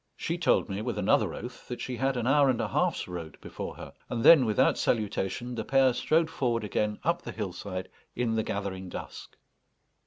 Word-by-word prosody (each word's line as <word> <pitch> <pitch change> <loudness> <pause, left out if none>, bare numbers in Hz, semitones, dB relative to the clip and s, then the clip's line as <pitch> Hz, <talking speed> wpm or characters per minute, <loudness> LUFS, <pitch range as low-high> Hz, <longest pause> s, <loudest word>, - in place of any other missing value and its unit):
She 170 +1 -3
told 165 - +3
me, 100 +1 -4
with 115 -1 -3
another 100 - +2
oath, 125 +1 -9
that 125 - -5
she 125 -1 -4
had 135 0 0
an 120 - -1
hour 140 +1 +4
and 125 - +1
a - - -1
half's - - 0
road 85 -4 -7
before - - -7
her. - - -10 0.2
And 115 -2 -2
then, 155 -6 +8
without 120 +5 +3
salutation, 110 +2 -1
the 115 -2 -3
pair 135 +1 +4
strode 160 +6 +2
forward 120 -7 0
again 105 0 -1
up 170 +1 +1
the - - -7
hillside 95 -2 -5 0.3
in 120 -2 0
the 110 - +1
gathering 95 -3 -4
dusk. - - -8
115 Hz, 195 wpm, -28 LUFS, 100-130 Hz, 0.3 s, then